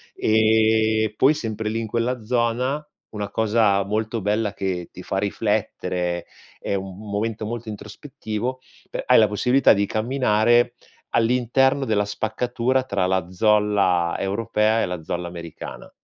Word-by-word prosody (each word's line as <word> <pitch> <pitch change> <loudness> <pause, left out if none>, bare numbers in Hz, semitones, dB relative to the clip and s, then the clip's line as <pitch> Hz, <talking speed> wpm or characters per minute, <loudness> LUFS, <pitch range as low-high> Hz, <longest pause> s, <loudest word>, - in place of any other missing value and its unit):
Ehm, 110 0 +3
poi 135 +7 +4
sempre 110 -6 -3
lì 110 +1 -2
in 115 - -3
quella 115 +1 -1
zona, 125 +5 0 0.3
una 105 -2 -4
cosa 105 -3 +2
molto 110 +2 -2
bella 105 +1 0
che 90 -3 -3
ti 90 - -10
fa 95 - -3
riflettere, 95 -4 -1 0.3
è - - -2
un 95 0 -4
m 105 0 -10
momento 110 +1 -2
molto 115 0 -5
introspettivo, 110 +2 -5 0.3
pe - - -3
hai - - +6
la 110 - +5
possibilità 125 +7 +4
di 100 0 +1
camminare 120 0 +2 0.4
all'interno 125 +4 +2
della 105 -4 +1
spaccatura 120 +5 -1
tra 100 -7 -1
la 95 -2 0
zolla 100 -4 +2
europea 110 +2 +1
e - - +1
la 90 -2 -5
zolla 85 +2 -3
americana. 85 -2 -9
110 Hz, 140 wpm, -23 LUFS, 100-115 Hz, 0.4 s, hai